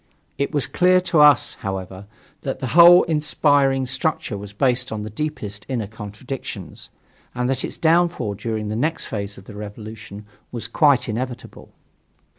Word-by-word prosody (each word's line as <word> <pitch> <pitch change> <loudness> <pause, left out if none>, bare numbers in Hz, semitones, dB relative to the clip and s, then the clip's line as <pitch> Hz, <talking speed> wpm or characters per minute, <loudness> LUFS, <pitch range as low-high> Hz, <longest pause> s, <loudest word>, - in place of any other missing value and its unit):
It 140 - 0
was 145 -4 0
clear 185 0 +3
to 170 -3 +1
us, 150 -1 +5
however, 95 -1 -6 0.3
that 135 - -3
the 130 - -4
whole 175 +2 +9
inspiring 145 -4 +2
structure 130 -3 -2
was 100 0 -8
based 125 +3 0
upon 110 -1 -4
the 105 - -7
deepest 105 -6 -5
inner 120 -5 -2
contradictions, 110 +5 -8 0.5
and 125 0 -1
that 130 0 -1
its - - -5
downfall 165 -9 +2
during 105 +1 -4
the 110 - -3
next 155 +8 -1
phase 100 -1 -5
of 95 - -12
the 105 - -11
revolution 105 0 -9 0.3
was 115 -2 -4
quite 135 0 +3
inevitable. 120 +2 -6
125 Hz, 155 wpm, -21 LUFS, 105-150 Hz, 0.5 s, whole